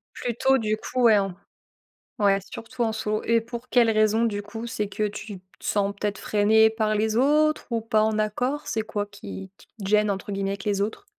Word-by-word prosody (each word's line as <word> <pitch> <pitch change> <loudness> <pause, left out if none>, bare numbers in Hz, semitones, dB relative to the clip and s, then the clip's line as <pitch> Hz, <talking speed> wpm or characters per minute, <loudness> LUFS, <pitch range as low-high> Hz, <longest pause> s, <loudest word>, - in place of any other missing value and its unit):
Plutôt 265 +3 +1
du 215 -2 -1
coup, 255 +3 -3
ouais 220 -3 +7
en 195 -2 -3 0.8
ouais 200 -1 +4
surtout 240 +2 -5
en 220 - 0
solo. 215 -1 -2
Et 230 0 +3
pour 235 +2 -8
quelle 235 -2 +4
raison 215 +1 +3
du 205 -3 -1
coup? 225 +3 -7
C'est 210 -3 -3
que 210 0 -1
tu 205 -1 -8
te 185 0 -23
sens 200 -1 0
peut-être 205 -1 -2
freiné 220 +1 +4
par 215 -1 0
les 215 +1 0
autres? 305 +4 +3
Ou 230 -1 0
pas 220 -1 +1
en 215 0 +1
accord? 250 +7 -1
C'est 220 - -1
quoi 205 -1 -3
qui 195 -2 -9
qui - - -20
te 200 -4 -8
«gêne», 210 0 +3
entre 195 +1 -4
guillemets, 195 0 -2
avec 200 -1 -5
les 200 -1 0
autres? 220 - -4
215 Hz, 215 wpm, -25 LUFS, 205-230 Hz, 0.8 s, ouais